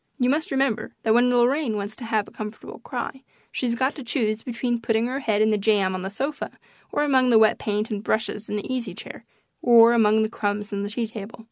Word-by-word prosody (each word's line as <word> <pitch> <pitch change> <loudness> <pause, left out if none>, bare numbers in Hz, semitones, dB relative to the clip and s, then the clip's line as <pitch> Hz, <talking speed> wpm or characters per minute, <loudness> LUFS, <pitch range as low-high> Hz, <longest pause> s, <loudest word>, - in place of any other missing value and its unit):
You 250 -2 +2
must 310 +2 -1
remember 270 -4 -1
that 220 - +3
when 245 +2 +4
Lorraine 245 0 +2
wants 205 +1 -4
to 245 - -7
have 220 -2 0
a - - -13
comfortable 210 0 -8
cry 265 - -5 0.3
she's 240 -2 -1
got 260 +3 0
to 280 - -8
choose 225 -3 -1
between 240 0 -2
putting 225 0 +1
her 260 +3 -2
head 215 -5 +1
in 220 - +3
the 210 - +1
jam 200 -2 +2
on 185 - -3
the 190 - -4
sofa, 275 +9 -4 0.3
or 295 - +1
among 260 -3 +3
the 230 - +6
wet 220 0 +4
paint 210 +1 -2
and 205 -1 -3
brushes 220 -1 -2
in - - -2
the 205 - -4
easy 235 -8 -3
chair, 215 - -10 0.4
or 235 -1 +7
among 220 -1 +4
the - - +1
crumbs 205 0 -3
on 200 - -2
the 200 - -3
tea 230 +2 -2
table. 220 -1 -9
225 Hz, 235 wpm, -24 LUFS, 210-250 Hz, 0.4 s, or